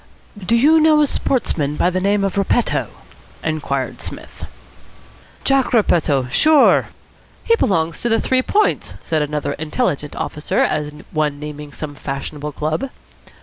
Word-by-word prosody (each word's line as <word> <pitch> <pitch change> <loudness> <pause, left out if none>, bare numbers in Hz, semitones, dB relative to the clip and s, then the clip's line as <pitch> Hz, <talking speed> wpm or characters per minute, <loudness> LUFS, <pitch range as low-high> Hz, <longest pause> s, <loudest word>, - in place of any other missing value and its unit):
"Do 225 +6 +2
you 300 +7 +5
know 310 -1 +5
a - - +4
sportsman 155 - -1
of 180 - +2
the 185 - 0
name 200 +1 +1
of 195 - -1
Repetto?" 200 +4 +1 0.6
inquired 145 -4 -2
Psmith. - - -8 1.0
"Jack 270 -2 +2
Repetto! 155 - +2
Sure." 310 - +5 0.6
"He 460 - +4
belongs 165 - 0
to 235 - 0
the 225 - +3
Three 260 0 +2
Points," 420 +10 0
said 160 -2 0
another 150 0 -2
intelligent 150 - -2
officer, 150 - -3
as 150 -1 0 0.2
one 150 -2 -1
naming 150 0 -8
some 145 0 -6
fashionable 145 +2 -5
club. 155 - -2
160 Hz, 140 wpm, -19 LUFS, 150-240 Hz, 1.0 s, you